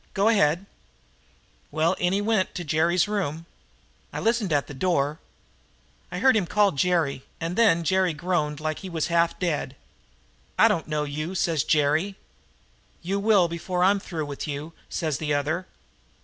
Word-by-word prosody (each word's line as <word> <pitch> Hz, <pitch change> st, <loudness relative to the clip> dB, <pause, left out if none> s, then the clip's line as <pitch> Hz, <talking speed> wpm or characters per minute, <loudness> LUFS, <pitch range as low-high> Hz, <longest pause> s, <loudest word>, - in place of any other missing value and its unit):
Go 200 Hz, +2 st, +3 dB
ahead." 175 Hz, -4 st, +2 dB, 1.0 s
"Well, 160 Hz, +3 st, +1 dB
in 175 Hz, 0 st, +1 dB
he 200 Hz, +2 st, +1 dB
went 210 Hz, -3 st, 0 dB
to 175 Hz, -, -3 dB
Jerry's 165 Hz, +3 st, +2 dB
room. 165 Hz, -6 st, -2 dB, 0.7 s
I -, -, -4 dB
listened 225 Hz, -4 st, +1 dB
at 145 Hz, -2 st, +2 dB
the -, -, -9 dB
door. 150 Hz, -1 st, 0 dB, 0.9 s
I -, -, -4 dB
heard 265 Hz, -3 st, +4 dB
him 200 Hz, -5 st, +1 dB
call 205 Hz, +2 st, +3 dB
Jerry, 155 Hz, -3 st, +1 dB, 0.2 s
and 165 Hz, +2 st, -3 dB
then 195 Hz, -7 st, +4 dB
Jerry 185 Hz, +2 st, +2 dB
groaned 150 Hz, -2 st, -1 dB
like 155 Hz, 0 st, -3 dB
he 190 Hz, -, -7 dB
was 165 Hz, -2 st, -2 dB
half 170 Hz, 0 st, +2 dB
dead. 155 Hz, -6 st, -2 dB, 0.8 s
"'I -, -, +7 dB
don't 165 Hz, -, -1 dB
know 150 Hz, -1 st, -1 dB
you,' 155 Hz, +5 st, -4 dB
says 165 Hz, -5 st, +1 dB
Jerry. 155 Hz, +6 st, +1 dB, 0.9 s
"'You 195 Hz, +3 st, -1 dB
will 200 Hz, -4 st, +4 dB
before 180 Hz, +2 st, -2 dB
I'm 200 Hz, +2 st, +4 dB
through 165 Hz, -5 st, -5 dB
with 145 Hz, +1 st, -6 dB
you,' 150 Hz, +3 st, -5 dB, 0.2 s
says 155 Hz, -5 st, -2 dB
the 150 Hz, -2 st, 0 dB
other. 155 Hz, +6 st, -1 dB
170 Hz, 165 wpm, -25 LUFS, 150-190 Hz, 1.0 s, I